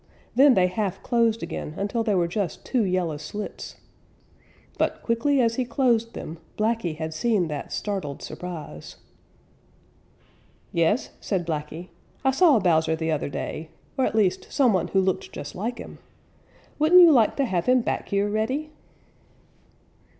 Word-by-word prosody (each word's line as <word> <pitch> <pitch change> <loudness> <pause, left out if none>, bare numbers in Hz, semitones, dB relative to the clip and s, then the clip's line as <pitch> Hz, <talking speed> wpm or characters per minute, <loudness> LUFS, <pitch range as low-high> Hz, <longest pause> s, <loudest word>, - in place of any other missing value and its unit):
Then 270 0 +6
they 185 - +4
half 195 +1 -2
closed 230 -2 +1
again 150 - -5
until 205 +4 -1
they 215 -3 +1
were 175 -2 +2
just 180 -1 -3
two 250 -4 +1
yellow 180 -5 -1
slits. 180 +8 -7 1.0
But - - 0
quickly 245 +5 +1
as 230 -2 +2
he 255 - +1
closed 235 -2 +1
them, 160 +1 -7 0.2
Blacky 215 -7 0
had 160 0 -4
seen 190 -1 +1
that 145 -2 -5
startled 190 -9 -4
surprise. 160 - -8 1.8
"Yes," 170 +8 +1
said 185 -4 -2
Blacky, 160 +2 -5 0.4
"I 265 - +5
saw 300 -1 +5
Bowser 160 -5 +2
the 160 0 -2
other 150 -2 -1
day, 155 +3 -5 0.3
or 265 - +1
at - - -4
least 190 -4 +1
some 255 -6 +3
one 185 - +1
who 195 - +1
looked 190 -1 -1
just 145 - -7
like 235 +6 -3
him. - - -10 0.8
Wouldn't 335 +4 +7
you 340 -2 +9
like 235 -7 +4
to 275 - +1
have 180 -7 -1
him 255 0 +5
back - - -3
here, 200 0 +1
Reddy?" 255 +9 -2
205 Hz, 155 wpm, -25 LUFS, 170-235 Hz, 1.8 s, you